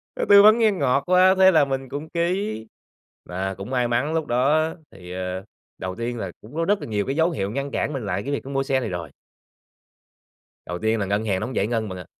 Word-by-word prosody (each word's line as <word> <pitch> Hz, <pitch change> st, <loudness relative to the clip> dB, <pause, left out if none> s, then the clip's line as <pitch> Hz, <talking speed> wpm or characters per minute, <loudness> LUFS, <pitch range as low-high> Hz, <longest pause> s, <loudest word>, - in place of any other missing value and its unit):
nó -, -, -1 dB
tư 200 Hz, 0 st, +9 dB
vấn 215 Hz, +2 st, +7 dB
nghe 220 Hz, -2 st, +4 dB
ngọt 140 Hz, -7 st, +1 dB
quá, 185 Hz, +1 st, +5 dB
thế 190 Hz, 0 st, +7 dB
là 155 Hz, -5 st, +4 dB
mình 135 Hz, -1 st, -4 dB
cũng 145 Hz, +4 st, -6 dB
ký. 170 Hz, -, -2 dB, 0.6 s
Và 95 Hz, +2 st, -3 dB
cũng 100 Hz, +4 st, -8 dB
may 125 Hz, -2 st, +1 dB
mắn 125 Hz, +6 st, 0 dB
lúc 160 Hz, -1 st, 0 dB
đó 150 Hz, +6 st, +2 dB, 0.2 s
thì, 90 Hz, -2 st, -12 dB
ờ 90 Hz, +1 st, -4 dB, 0.3 s
đầu 95 Hz, 0 st, -5 dB
tiên 120 Hz, +2 st, -4 dB
là 95 Hz, -5 st, -4 dB
cũng 110 Hz, +7 st, -14 dB
có 165 Hz, +1 st, 0 dB
rất 205 Hz, +2 st, +2 dB
là -, -, -6 dB
nhiều 105 Hz, -3 st, -1 dB
cái 135 Hz, -, -2 dB
dấu 165 Hz, +2 st, +2 dB
hiệu 100 Hz, -10 st, -3 dB
ngăn 140 Hz, +4 st, -3 dB
cản 150 Hz, -, -2 dB
mình 130 Hz, -6 st, -4 dB
lại 100 Hz, 0 st, -2 dB
cái 140 Hz, -, -4 dB
việc 140 Hz, -, -3 dB
mua 135 Hz, 0 st, -1 dB
xe 135 Hz, -1 st, +1 dB
này 120 Hz, -4 st, -3 dB
rồi. 85 Hz, -2 st, -5 dB, 1.6 s
Đầu 90 Hz, 0 st, -5 dB
tiên 110 Hz, +1 st, 0 dB
là 100 Hz, -, -1 dB
ngân 100 Hz, +3 st, -1 dB
hàng 95 Hz, -3 st, 0 dB
nó 105 Hz, -, -3 dB
hông 130 Hz, -, -7 dB
giải 100 Hz, -, +1 dB
ngân 110 Hz, -2 st, -2 dB
bạn 95 Hz, -, -6 dB
ạ. 90 Hz, -, -9 dB
125 Hz, 250 wpm, -23 LUFS, 100-155 Hz, 1.6 s, tư